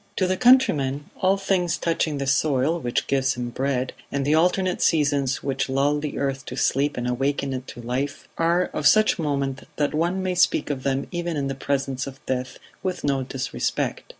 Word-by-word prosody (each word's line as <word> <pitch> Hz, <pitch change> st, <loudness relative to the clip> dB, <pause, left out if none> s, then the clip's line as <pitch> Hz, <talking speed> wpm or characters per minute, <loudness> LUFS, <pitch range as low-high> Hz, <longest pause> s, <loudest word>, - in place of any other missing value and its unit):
To 185 Hz, -, +1 dB
the 185 Hz, +1 st, +1 dB
countryman, 150 Hz, -, +3 dB
all 190 Hz, 0 st, +2 dB
things 185 Hz, -3 st, 0 dB
touching 160 Hz, -3 st, 0 dB
the 140 Hz, -, -2 dB
soil 140 Hz, +3 st, +2 dB
which 120 Hz, -5 st, -1 dB
gives 135 Hz, -1 st, +1 dB
him 120 Hz, 0 st, -4 dB
bread, 130 Hz, 0 st, -1 dB, 0.2 s
and 140 Hz, -1 st, -1 dB
the 145 Hz, -, +2 dB
alternate 180 Hz, +3 st, +2 dB
seasons 145 Hz, -4 st, +2 dB
which 135 Hz, -1 st, -1 dB
lull 140 Hz, +2 st, +2 dB
the 150 Hz, -1 st, -4 dB
earth 135 Hz, -1 st, -2 dB
to 125 Hz, -, -5 dB
sleep 140 Hz, +2 st, +1 dB
and 125 Hz, 0 st, -2 dB
awaken 135 Hz, +2 st, -1 dB
it 130 Hz, 0 st, -5 dB
to 120 Hz, -, -9 dB
life, 135 Hz, +4 st, -3 dB
are 170 Hz, +2 st, +1 dB
of 145 Hz, -, +2 dB
such 215 Hz, +3 st, +4 dB
moment 140 Hz, -3 st, -2 dB
that 145 Hz, 0 st, 0 dB
one 175 Hz, +5 st, 0 dB
may 185 Hz, -1 st, 0 dB
speak 175 Hz, -4 st, +2 dB
of 135 Hz, -2 st, -3 dB
them 135 Hz, 0 st, -1 dB
even 175 Hz, -2 st, -2 dB
in 140 Hz, -1 st, -1 dB
the -, -, -1 dB
presence 135 Hz, 0 st, -2 dB
of 135 Hz, 0 st, -9 dB
death 130 Hz, -1 st, -3 dB, 0.2 s
with 185 Hz, -2 st, -3 dB
no 140 Hz, -2 st, +1 dB
disrespect. 130 Hz, 0 st, -2 dB
140 Hz, 195 wpm, -24 LUFS, 135-170 Hz, 0.2 s, such